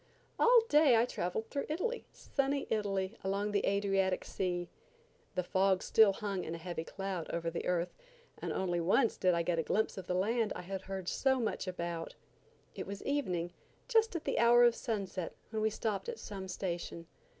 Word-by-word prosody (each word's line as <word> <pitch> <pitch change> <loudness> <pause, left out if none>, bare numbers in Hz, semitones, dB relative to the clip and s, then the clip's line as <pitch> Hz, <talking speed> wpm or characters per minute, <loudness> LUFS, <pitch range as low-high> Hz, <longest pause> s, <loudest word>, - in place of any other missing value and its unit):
All 480 0 +7
day 295 - +6
I 230 - +4
traveled 220 -1 -3
through 280 - -2
Italy–sunny 295 - -2
Italy, 200 -1 0
along 200 +2 0
the 205 - +1
Adriatic 195 -2 +1
Sea. 175 -2 -2 0.7
The 180 - +1
fog 190 +1 +2
still 220 -3 +5
hung 200 -2 -3
in 165 - -4
a - - -5
heavy 170 -1 -4
cloud 190 -1 -4
over 170 0 -2
the 170 - -3
earth, 180 -1 0 0.5
and - - -3
only 175 -2 0
once 200 +8 +3
did 180 -1 +3
I 170 - +1
get 170 -1 0
a - - +4
glimpse 200 +4 0
of 185 - -9
the 180 - 0
land 220 +3 +1
I - - -6
had 190 +1 -4
heard 190 -2 -6
so 265 +4 +2
much 220 -4 -2
about. 170 -2 -4 0.6
It - - -6
was 200 0 -6
evening, 180 -12 -1 0.3
just 450 -5 +3
at 335 - -3
the - - 0
hour 240 +1 +7
of 240 -1 +6
sunset, 195 -7 -3 0.2
when 220 -1 -1
we 220 - +3
stopped 215 - -2
at 475 - -4
some 195 - -7
station. 175 -2 -4
195 Hz, 185 wpm, -33 LUFS, 180-230 Hz, 0.7 s, All